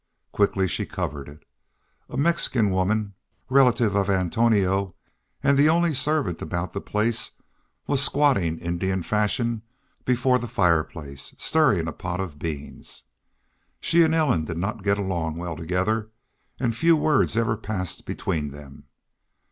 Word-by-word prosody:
Quickly 95 -2 +2
she - - -1
covered 70 0 -4
it. 75 +2 -15 0.6
A - - -6
Mexican 135 - +2
woman, 100 +2 0 0.4
relative 125 -5 +4
of 100 0 +1
Antonio, 95 0 +1 0.5
and 140 - +4
the 150 +2 +6
only 170 0 +3
servant 145 - 0
about 85 +3 -3
the 100 - -3
place, 110 +2 0 0.5
was 140 -1 +1
squatting 135 - +3
Indian 90 +2 -2
fashion 105 +4 0 0.4
before 125 0 +2
the 120 - -5
fireplace, 85 - -1
stirring 130 - +2
a 85 - -4
pot 90 0 -4
of 85 -6 -5
beans. 75 -2 -6 0.8
She 170 - +3
and 160 -1 +4
Ellen 130 - +2
did 85 0 -5
not 105 +5 -3
get 100 0 +2
along 85 -5 -2
well 85 -1 -4
together, 95 +7 -1 0.5
and 115 -3 0
few 165 +6 +4
words 150 -7 +2
ever 115 -1 +2
passed 100 -5 -4
between 75 -3 -3
them. 70 -1 -12
100 Hz, 140 wpm, -24 LUFS, 85-125 Hz, 0.8 s, the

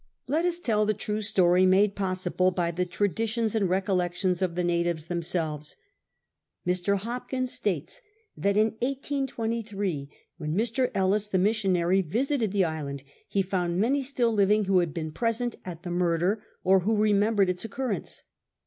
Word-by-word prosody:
Let 310 +6 0
us 350 -1 +1
tell 215 -8 +1
the 215 - +1
true 210 +1 -3
story, 185 -4 +3
made 195 +2 +4
]K)s 185 -2 -2
siblc 185 +1 +1
by 170 -2 0
the 180 +2 -1
traditions 220 +4 0
and 205 -5 +1
recollections 185 -1 0
of 180 -3 0
the 180 - 0
natives 170 -2 0
themselves. 165 -3 -3 0.9
Mr. 180 +3 +1
Hopkins 250 +4 -3
sttites 185 - -2 0.4
that 200 +1 +1
in 215 +1 +4
1823, 230 - -2 0.3
when 155 -1 -3
Mr. 235 +4 +1
Ellis, 195 +2 +2
the 195 - 0
missionary, 190 -2 +2
visited 230 - 0
the 195 -2 +2
island, 145 -4 -4 0.3
hd' 195 -1 +1
found 180 -2 -1
many 265 +7 +2
still 255 -4 0
living 210 0 +3
who 190 -1 +4
had 170 -3 0
been 155 0 -4
preseiit 230 +6 -1
at 175 -1 -7
the 175 - -5
murder, 175 +3 +1 0.2
or 190 +1 +5
who 210 +4 +1
remembered 210 -1 +3
its 180 - -6
occurrence. 225 -3 -4
195 Hz, 160 wpm, -27 LUFS, 175-220 Hz, 0.9 s, or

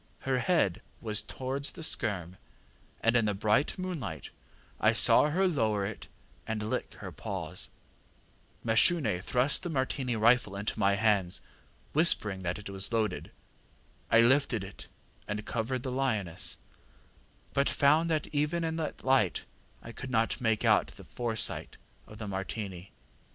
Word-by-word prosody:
Her 130 -1 0
head 145 - +1 0.2
was 105 -3 0
towards 135 +2 -3
the 165 - -8
skerm, 95 - 0 0.6
and 115 +1 +2
in 115 -2 +3
the 105 -1 0
bright 105 - +1
moonlight 145 - -5 0.5
I - - +4
saw 150 - +6
her 190 +5 +2
lower 110 - 0
it 105 +2 -7 0.4
and 110 -1 -2
lick 110 - -3
her - - -8
paws. - - -5 1.0
ŌĆ£Mashune 115 - +3
thrust 125 +7 +2
the 180 - -5
Martini 130 -4 -1
rifle 110 -2 +3
into 105 +2 -3
my 100 -1 +3
hands, 100 -4 +1 0.5
whispering 110 - +3
that 90 -1 -2
it 105 - -9
was 95 +2 +1
loaded. 110 -5 -1 0.8
I 115 - +6
lifted 120 -3 +3
it 95 +1 -10 0.4
and 105 +1 -4
covered 120 +2 -2
the 130 - -3
lioness, 110 -10 -1 1.0
but 140 0 +2
found 155 +4 +3
that 155 -2 0
even 150 +3 0
in 160 0 -2
that 160 -2 -4
light 130 -9 +2 0.4
I 115 - -8
could 125 +2 -8
not 115 +1 0
make 110 -3 +1
out - - +4
the - - -13
foresight 115 -3 -1 0.3
of 110 - -12
the 105 -1 -6
Martini. 95 -1 -5
115 Hz, 145 wpm, -30 LUFS, 105-140 Hz, 1.0 s, saw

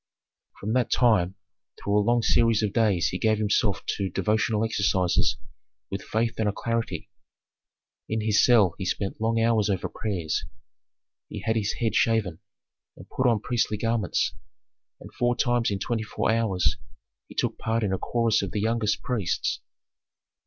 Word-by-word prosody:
From 105 +2 -2
that 125 -1 +1
time 95 -7 +3 0.4
through 100 - -1
a - - +3
long 120 +2 +2
series 115 -2 +3
of 105 -2 -1
days 105 -7 +2
he 90 - -4
gave 110 -1 +2
himself 105 -1 0
to 100 -1 -1
devotional 110 +1 0
exercises 95 -5 +1 0.5
with 95 - -3
faith 115 +1 -2
and 110 -2 +2
alacrity. 115 +3 -3 1.0
In 110 0 -1
his 105 -1 +3
cell 110 -8 +5
he 95 - -3
spent 100 +3 -3
long 115 +1 +1
hours 115 -2 +2
over 95 -3 -1
prayers, 90 -8 -3 0.9
he - - -6
had 110 0 0
his 105 -2 0
head 115 -3 -1
shaven, 110 -8 +1 0.6
and - - -13
put 130 - +1
on 115 -4 +2
priestly 115 -3 0
garments, 115 -3 0 0.7
and - - -12
four 120 0 +1
times 120 -2 +1
in 100 - -1
twenty 115 +3 -2
four 110 0 -1
hours 110 -5 +1 0.5
he - - -14
took - - -1
part 115 0 -1
in 100 -2 0
a 95 - -1
chorus 115 -2 +1
of - - -3
the 105 - -1
youngest 110 -1 0
priests. 115 -9 -1
110 Hz, 160 wpm, -26 LUFS, 100-115 Hz, 1.0 s, cell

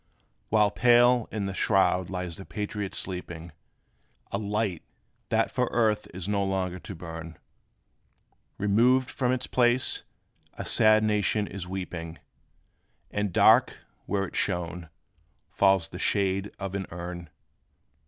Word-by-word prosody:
While 105 -2 +3
pale 120 +3 +4
in 105 -2 -2
the 95 - -3
shroud 95 -2 +2
lies 90 -3 -4
the 95 - -8
Patriot 105 0 -4
sleeping, 85 -2 -5 0.8
A 100 - -1
light, 105 -4 -2 0.5
that - - +1
for - - 0
earth 110 -3 +1
is 95 0 -6
no 100 -1 +1
longer 95 -2 -2
to - - -8
burn, 80 -1 -8 1.2
Removed 120 +6 +3
from 125 -2 0
its 130 0 -1
place, 125 0 +2 0.5
a - - -6
sad 110 0 +5
nation 105 -1 +1
is 100 -3 -7
weeping; 90 -3 -6 0.9
And 105 -1 -1
dark, - - +5 0.3
where 100 0 0
it - - -10
shone, 85 -1 -2 0.6
falls 95 -4 +3
the - - -8
shade 100 0 0
of 95 -1 -5
an 100 -1 -3
urn. 85 -1 -7
100 Hz, 130 wpm, -27 LUFS, 90-105 Hz, 1.2 s, sad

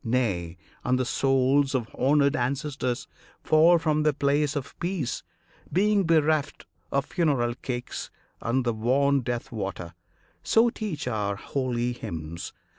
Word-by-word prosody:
Nay, 100 -9 -1 0.3
and 125 0 +2
the 130 - 0
souls 135 +2 +2
of 120 -4 0
honoured 140 +2 +3
ancestors 135 0 -2 0.4
Fall 160 +2 +6
from 155 -2 +1
their 150 -1 +3
place 145 +1 +1
of 140 -2 -4
peace, 175 -7 -2 0.5
being 200 +1 +3
bereft 155 -2 +2 0.3
Of 140 0 +1
funeral 140 -10 +1
cakes 125 0 -5 0.3
and 125 +2 0
the 120 - +1
wan 135 +5 +2
death 120 -1 -4
water.[FN#1] 95 -6 -5 0.5
So 230 +1 +4
teach 185 - -4
our 105 -4 -1
holy 125 +1 -2
hymns. 85 -8 -6
135 Hz, 130 wpm, -26 LUFS, 120-150 Hz, 0.5 s, Fall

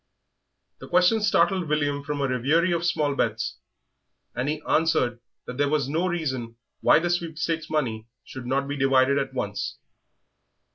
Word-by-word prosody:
The - - -10
question 180 +5 +3
startled 185 -3 +2
William 145 -2 0
from 145 0 -3
a 140 - +1
reverie 145 +8 +2
of 170 0 0
small 150 -4 +1
bets, 105 - -1 0.7
and 125 +3 -2
he 155 0 -2
answered 130 -7 +2 0.3
that 125 +2 -7
there 145 0 +2
was 145 -3 +1
no 165 +6 0
reason 130 -10 -3 0.2
why - - +5
the 175 +2 0
sweepstakes 165 -2 -2
money 115 -8 -2 0.2
should 130 -2 -9
not 140 +2 0
be 145 - -3
divided 135 0 +3
at 135 -1 -4
once. 100 -5 -3
145 Hz, 155 wpm, -25 LUFS, 130-165 Hz, 0.7 s, why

